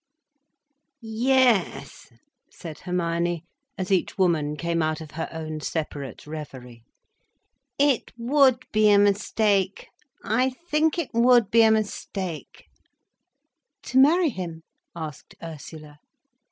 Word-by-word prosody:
"Yes," 240 0 +1 0.4
said 160 -3 -9
Hermione, 170 -1 -2 0.3
as 190 0 -4
each 190 0 0
woman 155 -5 +1
came 170 0 -1
out 155 0 -1
of 155 -2 -10
her 160 +2 -5
own 155 -1 -5
separate 145 -6 -5
reverie. 130 -6 -9 1.0
"It 280 -4 +2
would 260 +1 +3
be 215 0 +4
a 205 - +6
mistake—I 205 +4 0 0.2
think 310 +2 +2
it 335 -5 -3
would 235 -2 +4
be 230 - +6
a 225 - +6
mistake—" 200 -5 -3 1.2
"To 260 - +1
marry 325 +5 +5
him?" 170 -6 -7 0.3
asked 155 -4 -8
Ursula. 155 -2 -10
190 Hz, 105 wpm, -25 LUFS, 160-235 Hz, 1.2 s, a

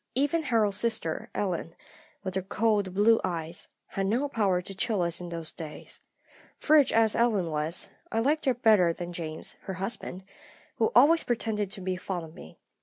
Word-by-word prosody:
Even 290 +5 +2
Harold's 220 -8 +1
sister 220 -9 -1
Ellen, 175 -4 -2 0.5
with 190 -2 -4
her 190 - 0
cold 200 -1 0
blue 225 +3 +5
eyes, 165 -1 -2 0.2
had 195 0 -2
no 245 +8 +1
power 205 -9 +1
to 180 +2 -7
chill 210 -1 0
us 170 0 -1
in 175 - -6
those 165 -2 -5
days. 155 -3 -7 0.6
Frigid 300 -6 +4
as 225 -1 +4
Ellen 210 -8 +2
was, 155 +3 -1 0.2
I - - -2
liked 295 +7 +1
her 260 -2 +3
better 210 -8 +4
than 175 +1 -6
James, 160 -2 -3
her 190 - -4
husband, 190 -1 -2 0.5
who 225 - +2
always 310 +7 +6
pretended 220 -4 -1
to 195 - -7
be 185 0 -2
fond 180 -2 -4
of 160 - -13
me. 80 - -13
195 Hz, 180 wpm, -28 LUFS, 175-230 Hz, 0.6 s, always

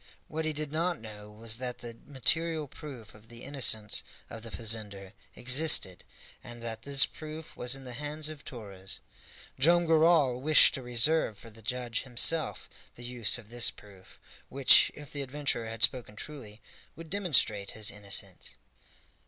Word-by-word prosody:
What 160 +1 -4
he 155 - 0
did 150 -1 -4
not 170 +2 -1
know 105 -2 -11
was 110 +1 -3
that 125 -1 -5
the 120 -1 -9
material 155 +4 0
proof 130 -6 -11
of 105 +1 -18
the 120 +1 -12
innocence 120 -7 +2 0.3
of 115 - -8
the 115 - -9
fazender 105 -4 0 0.2
existed, 125 - +4 0.4
and 120 0 -11
that 115 -1 -6
this 140 +1 +3
proof 155 0 -10
was 125 +2 +1
in 135 - -6
the 125 -1 -8
hands 150 +3 -2
of 155 -2 -7
Torres. 100 -6 -8 0.6
Joam 170 +5 +4
Garral 160 -6 +4
wished 155 +1 +6
to 135 - -5
reserve 125 0 +1
for 115 +3 -13
the 110 +1 -15
judge 120 0 -3
himself 135 +6 +1 0.3
the 120 - -12
use 120 -2 0
of 115 -2 -14
this 120 -1 +1
proof, 95 -3 -17 0.3
which, 135 -1 +6
if 150 -1 -11
the 145 - -4
adventurer 140 -4 -2
had 115 0 -3
spoken 120 -3 +2
truly, 115 -5 -7 0.3
would 165 +1 -11
demonstrate 130 - +1
his 105 -2 -2
innocence. 100 - -6
125 Hz, 160 wpm, -29 LUFS, 110-150 Hz, 0.6 s, wished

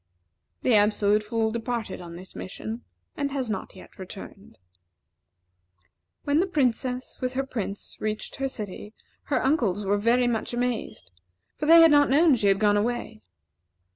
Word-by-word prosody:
The 250 - +3
Absolute 210 0 +3
Fool 220 +1 -1
departed 230 -4 -4
on 170 -1 -9
this 185 +2 -11
mission, 220 +5 -6 0.3
and 280 -1 -1
has 260 -5 -2
not 195 - -5
yet 185 - -15
returned. 190 +1 -10 1.7
When 285 +2 +2
the 375 - +2
Princess, 255 -5 -1
with 255 0 -1
her 270 +1 -1
Prince, 205 -6 -5
reached 215 0 -4
her 270 0 -1
city, 210 -2 -7 0.3
her 280 - 0
uncles 220 - +1
were 205 +1 +1
very 240 +4 +3
much 240 0 -1
amazed; 245 - -3 0.4
for 300 - -3
they 330 +1 +9
had 330 -1 +7
not 290 -1 +5
known 305 +3 +5
she 215 -5 +2
had 195 -1 +4
gone 205 -1 +3
away. 225 0 -2
230 Hz, 155 wpm, -26 LUFS, 205-265 Hz, 1.7 s, they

